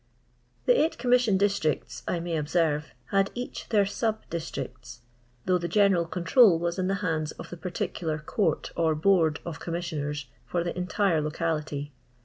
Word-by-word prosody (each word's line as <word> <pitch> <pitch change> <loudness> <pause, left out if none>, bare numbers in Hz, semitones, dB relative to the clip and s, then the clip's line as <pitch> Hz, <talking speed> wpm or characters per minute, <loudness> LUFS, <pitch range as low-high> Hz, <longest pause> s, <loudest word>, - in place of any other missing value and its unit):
The - - +5
eight 320 - +1
c(«imission 245 -4 +3
districts!, 195 -6 0
I 175 - 0
may 170 0 -2
observe, 150 -1 +1 0.2
had 195 0 +3
each 245 +1 -6
their 205 -3 +4
sub 220 +2 -2
districts, 130 -7 -6 0.4
though 180 -1 +3
the 170 - -2
"general 185 -2 +3
control 180 +2 +5
wns 170 +2 -2
in 185 - +1
the 195 - +1
hands 155 -3 -1
of - - -10
the 175 - -6
particular 165 -2 -3
Court 155 +7 -1
or 160 -2 +2
Board 160 -2 +3
of 165 -4 -5
Commissioners 150 -5 -3 0.2
for 175 -1 0
the 175 - -3
entire 180 -2 +1
locality. 150 -2 -2
170 Hz, 155 wpm, -27 LUFS, 155-195 Hz, 0.4 s, The